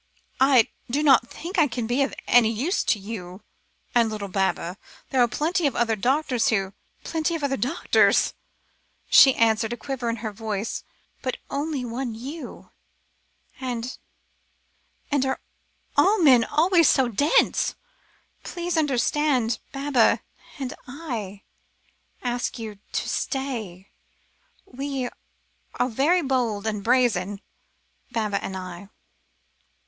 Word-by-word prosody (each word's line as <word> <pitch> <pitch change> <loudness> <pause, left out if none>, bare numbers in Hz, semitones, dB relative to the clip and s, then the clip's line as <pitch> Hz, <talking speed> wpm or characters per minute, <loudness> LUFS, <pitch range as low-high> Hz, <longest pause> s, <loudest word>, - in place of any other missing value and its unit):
"I 260 -4 +5 0.2
do 285 +5 0
not 265 -5 +5
think 350 +3 -4
I 310 - +5
can 235 -2 -3
be 245 +4 0
of 275 - +1 0.2
any 235 -2 +5
use 270 - 0
to - - +2
you 195 -2 -8 0.5
and 235 -2 +4
little 210 -2 -5
Baba. 190 -2 -1 0.3
There 260 - +3
are 240 - +5
plenty 320 - 0
of 275 - -2
other 230 -2 +1
doctors 255 +2 +1
who 195 -3 0 0.2
" - - -38
"Plenty 325 +1 -1
of 315 - -4
other 275 -1 +1
doctors," 270 +6 +2 0.8
she 270 -2 +8
answered, 225 0 +2
a - - -5
quiver 260 -3 -3
in 230 - -1
her 215 - -2
voice; 215 0 -4 0.4
"but 255 - -3
only 285 -2 -2
one 240 0 -4
you 275 +8 -8 0.9
and 250 -1 -4 1.2
and 285 -2 +2
are 265 0 -1 0.6
all 420 +3 +5
men 260 - +6
always 335 +2 +4
so 265 -3 +3
dense? 260 +7 +2 0.7
Please 350 -1 -3
understand, 270 -4 +1
Baba 275 -4 +2 0.4
and 265 -3 -4
I 235 - -6 0.8
ask 245 0 -2
you 215 -3 -7
to - - -1
stay. 225 -10 -3 0.7
We 270 -1 -4 0.7
are 250 - +1
very 305 +9 +2
bold 240 -6 0
and 210 -2 -2
brazen 220 -6 +2 0.7
Baba 215 -4 -1
and 190 - -4
I!" 185 +1 -8
245 Hz, 130 wpm, -24 LUFS, 220-280 Hz, 1.2 s, she